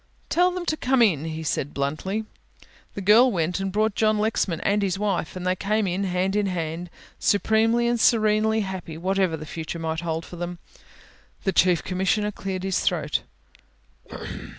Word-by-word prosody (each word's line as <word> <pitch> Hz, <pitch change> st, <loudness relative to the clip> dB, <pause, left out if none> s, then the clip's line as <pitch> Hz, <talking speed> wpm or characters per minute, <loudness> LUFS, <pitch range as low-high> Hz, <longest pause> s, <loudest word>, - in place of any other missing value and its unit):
"Tell 355 Hz, +2 st, +4 dB
them 360 Hz, -1 st, -4 dB
to 315 Hz, -, 0 dB
come 260 Hz, -4 st, +3 dB
in," 160 Hz, -9 st, +2 dB
he 160 Hz, 0 st, -4 dB
said 145 Hz, -2 st, -2 dB
bluntly. 155 Hz, +10 st, -2 dB, 0.7 s
The 200 Hz, -, -4 dB
girl 225 Hz, +6 st, +6 dB
went 175 Hz, -1 st, -1 dB
and 195 Hz, 0 st, -2 dB
brought 215 Hz, +2 st, +1 dB
John 215 Hz, +1 st, +2 dB
Lexman 210 Hz, -5 st, 0 dB
and 205 Hz, +1 st, +1 dB
his 195 Hz, -1 st, 0 dB
wife, 195 Hz, -5 st, -1 dB
and 180 Hz, 0 st, -5 dB
they 185 Hz, 0 st, +2 dB
came 210 Hz, +3 st, 0 dB
in 190 Hz, +2 st, -1 dB
hand 185 Hz, +1 st, 0 dB
in 210 Hz, -1 st, +1 dB
hand 170 Hz, -1 st, -3 dB, 0.3 s
supremely 225 Hz, +3 st, +2 dB
and 240 Hz, 0 st, +1 dB
serenely 220 Hz, -1 st, +3 dB
happy 190 Hz, -5 st, -5 dB
whatever 185 Hz, -1 st, 0 dB
the 155 Hz, -, -8 dB
future 160 Hz, +1 st, -5 dB
might 160 Hz, -1 st, -2 dB
hold 165 Hz, -1 st, -3 dB
for 175 Hz, -, -10 dB
them. 175 Hz, +1 st, -4 dB, 0.9 s
The 195 Hz, -, 0 dB
Chief 180 Hz, -2 st, +3 dB
Commissioner 190 Hz, +3 st, 0 dB
cleared 190 Hz, -2 st, -5 dB
his 190 Hz, -1 st, 0 dB
throat. -, -, 0 dB
190 Hz, 175 wpm, -24 LUFS, 175-215 Hz, 0.9 s, girl